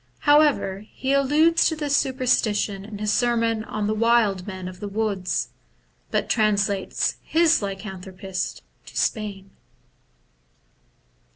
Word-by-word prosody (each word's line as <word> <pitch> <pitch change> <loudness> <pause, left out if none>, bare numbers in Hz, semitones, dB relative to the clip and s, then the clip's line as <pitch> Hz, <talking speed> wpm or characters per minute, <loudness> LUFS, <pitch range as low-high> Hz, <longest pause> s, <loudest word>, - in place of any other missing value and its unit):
However, 290 -10 +3
he 270 +1 -1
alludes 300 +4 +4
to 320 - -3
this 295 -2 0
superstition 220 -7 +1
in 210 0 -8
his 210 0 0
sermon 230 -2 +1
on 215 0 -2
wild 220 -5 +2
men 185 -2 -6
of 185 0 -9
the 205 - -5
woods, 200 -3 -1 0.6
but - - 0
translates 205 -3 0
his 330 -3 +3
lycan 195 -1 -5
thropists 190 0 -5 0.3
to - - -10
Spain. 200 -3 -2
215 Hz, 115 wpm, -24 LUFS, 195-255 Hz, 0.6 s, alludes